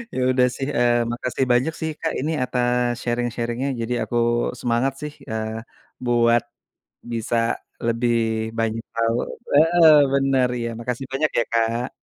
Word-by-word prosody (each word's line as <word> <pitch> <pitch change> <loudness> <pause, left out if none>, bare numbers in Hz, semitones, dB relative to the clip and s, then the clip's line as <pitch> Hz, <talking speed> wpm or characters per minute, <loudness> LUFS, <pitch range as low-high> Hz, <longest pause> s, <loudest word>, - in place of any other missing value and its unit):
Ya - - -1
udah 125 -1 +4
sih, 135 - -3
eee, 120 -1 +3
makasih 125 +2 -2
banyak 130 +7 +2
sih, 160 - -1
Kak, 165 - -1
ini 150 +4 -1
atas 125 -1 +1 0.2
sharing-sharing-nya, 120 +2 -2
jadi 120 +2 -2
aku 120 - -3 0.4
semangat 120 +3 0
sih, 150 - -5 0.2
eee, 110 0 -2 0.6
buat 120 -1 +3 0.7
bisa 115 +1 -1 0.5
lebih 120 +1 +1 0.4
banyak 115 0 -1
tahu 115 0 +1 0.4
heeh, 165 +2 +6 0.2
bener, 135 -2 +2
iya, 115 0 -2
makasih 125 +2 -4
banyak 150 +3 +1
ya, 120 - +3
Kak. 115 +2 +1
120 Hz, 140 wpm, -22 LUFS, 115-135 Hz, 0.7 s, heeh